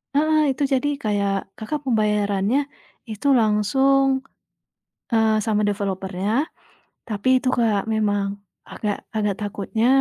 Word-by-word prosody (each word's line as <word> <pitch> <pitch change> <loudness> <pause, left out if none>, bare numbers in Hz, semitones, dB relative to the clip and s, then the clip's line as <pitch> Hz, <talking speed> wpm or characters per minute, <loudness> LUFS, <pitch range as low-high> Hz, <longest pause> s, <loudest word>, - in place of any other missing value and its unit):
Heeh, 310 +2 +3
itu 265 +2 -2
jadi 265 +2 +1 0.2
kayak 200 -2 0 0.2
Kakak, 260 +8 -3
pembayarannya 210 -1 +1 0.5
itu 215 +5 -3
langsung, 250 +6 +3 1.1
eee, 220 -1 +3
sama 215 -2 +1
developer-nya, 195 -1 -2 0.8
tapi 210 +2 -2
itu 255 - -2
Kak, 220 -4 +2
memang 205 -2 +1 0.4
agak 210 -2 -2 0.2
agak 210 -2 +1
takutnya 210 +2 -2
210 Hz, 110 wpm, -22 LUFS, 205-235 Hz, 1.1 s, Heeh